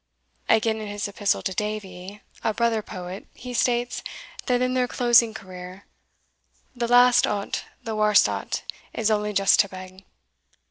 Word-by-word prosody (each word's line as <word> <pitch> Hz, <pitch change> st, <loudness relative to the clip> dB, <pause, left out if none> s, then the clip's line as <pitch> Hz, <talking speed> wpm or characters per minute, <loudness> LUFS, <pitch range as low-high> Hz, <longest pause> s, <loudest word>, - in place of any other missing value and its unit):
Again, 220 Hz, 0 st, +3 dB
in 215 Hz, -, -5 dB
his 205 Hz, 0 st, -3 dB
Epistle 205 Hz, 0 st, 0 dB
to 190 Hz, -, -2 dB
Davie, 205 Hz, -1 st, -5 dB, 0.2 s
a 220 Hz, -, 0 dB
brother 230 Hz, -1 st, +1 dB
Poet, 185 Hz, -1 st, -8 dB
he 250 Hz, 0 st, -8 dB
states, 245 Hz, +1 st, 0 dB, 0.5 s
that 250 Hz, -2 st, +2 dB
in 255 Hz, 0 st, 0 dB
their 250 Hz, -1 st, +1 dB
closing 240 Hz, -2 st, +4 dB
career 185 Hz, -2 st, -10 dB, 0.9 s
The 240 Hz, -1 st, -1 dB
last 245 Hz, +1 st, +6 dB
o't, 200 Hz, -1 st, -3 dB, 0.2 s
the 225 Hz, -1 st, -4 dB
warst 210 Hz, -1 st, +5 dB
o't, -, -, -3 dB, 0.3 s
Is 220 Hz, -1 st, 0 dB
only 210 Hz, 0 st, 0 dB
just 195 Hz, -1 st, +4 dB
to 200 Hz, -, +4 dB
beg. 185 Hz, 0 st, -10 dB
215 Hz, 150 wpm, -24 LUFS, 195-235 Hz, 0.9 s, last